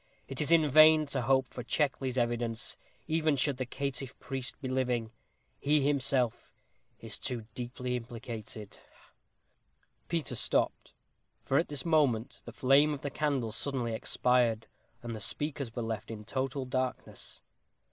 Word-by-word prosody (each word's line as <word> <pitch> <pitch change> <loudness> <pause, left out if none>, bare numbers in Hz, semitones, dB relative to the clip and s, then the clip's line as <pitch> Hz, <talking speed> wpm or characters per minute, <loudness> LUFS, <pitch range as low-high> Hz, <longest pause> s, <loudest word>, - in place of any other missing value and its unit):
It 135 +1 -4
is 150 - -1
in 160 -2 +6
vain 155 +2 +7
to 140 -2 -2
hope 130 +1 +3
for 125 - -5
Checkley's 130 0 0
evidence, 120 -2 -1 0.3
even 155 -2 +2
should 140 0 +1
the 130 -1 -3
caitiff 135 -1 -4
priest 135 -1 -5
be 135 - -5
living. 125 -3 0 0.5
He 150 +2 +3
is 145 - +2
himself 135 -4 +1 0.5
too 120 -3 -3
deeply 125 0 -4
implicated 115 -3 -7 0.2
ha!" - - -24 1.0
Peter 165 -5 -1
stopped, - - 0 0.5
for 135 - +3
at 165 - 0
this 145 -3 -2
moment 140 -9 +2
the 120 - -7
flame 140 +5 +4
of 135 - -10
the 140 - -3
candle 140 -6 0
suddenly 120 0 -2
expired, 115 -1 +1 0.4
and 120 -1 -4
the - - -6
speakers 140 +2 -3
were 120 - -2
left 110 -1 -4
in 105 -2 -7
total 135 +2 -2
darkness. 130 0 -4
130 Hz, 145 wpm, -31 LUFS, 120-140 Hz, 1.0 s, vain